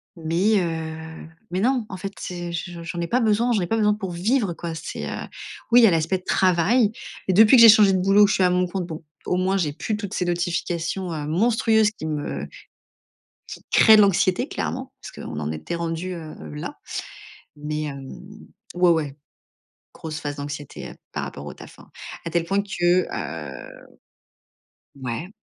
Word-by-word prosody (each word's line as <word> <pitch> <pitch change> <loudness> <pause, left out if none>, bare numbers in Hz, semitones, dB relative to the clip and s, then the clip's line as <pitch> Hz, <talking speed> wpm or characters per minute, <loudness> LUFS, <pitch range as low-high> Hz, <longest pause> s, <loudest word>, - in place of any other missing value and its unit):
mais, 175 +6 +1
heu, 160 -1 -5 0.2
mais 180 - -1
non, 245 +2 +1
en 190 - -6
fait 195 +2 -6
c'est 175 -1 -5
je 170 0 -5
j'en 170 +1 -4
ai 170 - -2
pas 245 - +2
besoin, 225 +2 +2
j'en 215 -4 +2
ai 175 - -2
pas 225 - 0
besoin 210 -1 +3
pour 195 -4 -5
vivre 200 +3 0
quoi 165 0 -6
c'est, - - -5
heu, - - -4 0.5
oui 245 +1 +8
il - - +5
y - - +9
a - - +4
l'aspect 165 +3 +1
travail, 185 +5 +3 0.4
mais 190 - +2
depuis 220 +6 +7
que - - +8
j'ai 230 - +11
changé 210 -2 +7
de - - +3
boulot 195 +2 +5
je 210 - +1
suis 190 - +2
à 180 - +5
mon 180 0 +2
compte 180 0 -3
bon, 160 -2 -7 0.2
au - - 0
moins 190 +1 +1
j'ai 155 -6 -1
plus 210 +7 -3
toutes 205 -1 -6
ces 180 - -1
notifications, 175 +1 -2
heu, 150 -2 -4
monstrueuses 220 +4 +3
qui 210 - -8
me 150 -2 -3 1.1
qui - - -8
créent 220 -1 +7
de - - +7
l'anxiété 195 - +2
clairement, 260 +1 -4
parce - - -9
qu'on 75 - -7
en 75 +1 -3
était 80 - -5
rendu, 170 +2 -3
heu, 160 -3 -8 0.2
là, 75 - -6 0.8
mais, 150 +1 -4
hem, 140 -2 -6 0.7
ouais, 180 0 +4
ouais, 150 -4 0 0.8
grosse 160 -1 -6
phase 145 -1 -4
d'anxiété, 145 0 -6
heu, - - -13 0.2
par - - -3
rapport 70 - -8
au 75 - -7
taf, - - -14
hein. - - -16 0.4
À - - -2
tel 170 0 0
point 195 +3 +1
que, 180 -3 +1
heu 75 -3 -6 1.4
ouais. 125 +7 -4
175 Hz, 195 wpm, -23 LUFS, 160-205 Hz, 1.4 s, j'ai